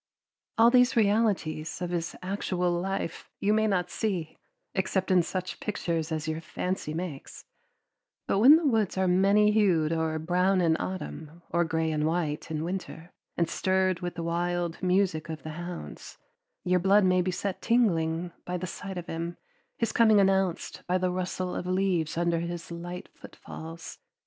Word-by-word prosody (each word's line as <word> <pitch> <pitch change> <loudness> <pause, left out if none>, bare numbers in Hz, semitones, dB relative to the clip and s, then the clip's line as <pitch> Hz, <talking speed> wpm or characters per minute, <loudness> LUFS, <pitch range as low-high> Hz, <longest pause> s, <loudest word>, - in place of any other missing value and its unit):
All 230 +1 +6
these 250 0 +5
realities 200 -8 +1
of 180 -1 -3
his 170 -1 -2
actual 180 -2 -1
life 175 -1 -3
you 205 +1 +2
may 220 0 +3
not 180 -4 0
see 185 -8 -3 0.3
except 190 0 0
in 185 -1 +6
such 185 +2 -4
pictures 170 -6 -2
as 155 -1 -2
your 160 +1 -2
fancy 180 0 -3
makes; 160 -3 -6 0.8
but 195 - +1
when 265 +8 +9
the 325 0 +1
woods 220 -9 +1
are 190 0 +2
many 200 +3 +4
hued 175 -7 +3
or 160 -1 0
brown 180 +4 +2
in 165 -2 +3
autumn, 170 -3 -6
or 170 +1 +3
gray 160 -1 0
and 155 0 0
white 160 -3 -2
in 155 -1 -2
winter, 175 -1 -5 0.3
and 170 - +2
stirred 185 0 +1
with 175 -1 -4
the 170 - -4
wild 175 0 -1
music 180 -3 +1
of 160 -1 -6
the 155 - -5
hounds, 175 +2 -8 0.5
your 180 0 +2
blood 195 +2 +4
may 185 0 +4
be 180 - -1
set 185 +1 -3
tingling 175 -8 +1
by 180 0 -3
the 180 - -4
sight 185 +1 -6
of 175 - -5
him, 170 +1 -4 0.4
his 230 -2 0
coming 220 -3 +5
announced 190 -2 +1
by 180 +1 +2
the 185 0 0
rustle 185 0 -3
of 180 - -4
leaves 185 -4 0
under 170 -1 +1
his 170 0 -5
light 175 +1 -6
footfalls. 160 +1 -10
180 Hz, 170 wpm, -28 LUFS, 165-195 Hz, 0.8 s, when